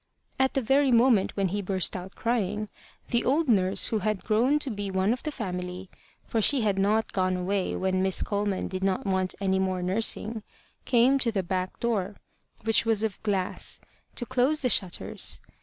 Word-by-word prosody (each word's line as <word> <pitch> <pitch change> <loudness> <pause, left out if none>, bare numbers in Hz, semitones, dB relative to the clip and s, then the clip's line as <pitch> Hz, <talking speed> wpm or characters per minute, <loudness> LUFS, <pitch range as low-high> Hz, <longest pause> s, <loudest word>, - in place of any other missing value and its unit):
At 265 0 +2
the 270 - +1
very 270 +3 +3
moment 235 -5 +3
when 195 -2 +1
he 205 +3 -2
burst 190 -1 +1
out 185 +1 -7
crying, 215 -3 -1 0.4
the 235 - +1
old 300 +5 +1
nurse 190 -5 +3
who 220 - 0
had 215 -1 -2
grown 240 +7 +2
to 285 -3 -2
be 205 -2 -4
one 190 +3 +1
of 250 - -6
the 305 - -4
family, 180 -5 -6 0.3
for 225 - -1
she 270 +4 +5
had 205 -3 0
not 215 +3 +1
gone 185 -1 0
away 190 +1 -1
when 185 0 0
Miss 190 -1 +1
Coleman 205 -2 -2
did 185 0 -5
not 195 0 0
want 190 -1 -1
any 190 -1 +1
more 185 -1 -1
nursing, 215 +3 0 0.4
came 255 +2 +4
to 240 -3 +1
the 195 -3 -1
back 185 +1 -3
door, 210 -4 -1 0.5
which 225 0 +3
was 225 -2 +1
of 220 -3 -3
glass, 195 -4 -2 0.4
to 240 - -2
close 260 +5 +1
the 250 - +2
shutters. 185 -6 +1
205 Hz, 190 wpm, -27 LUFS, 190-235 Hz, 0.5 s, she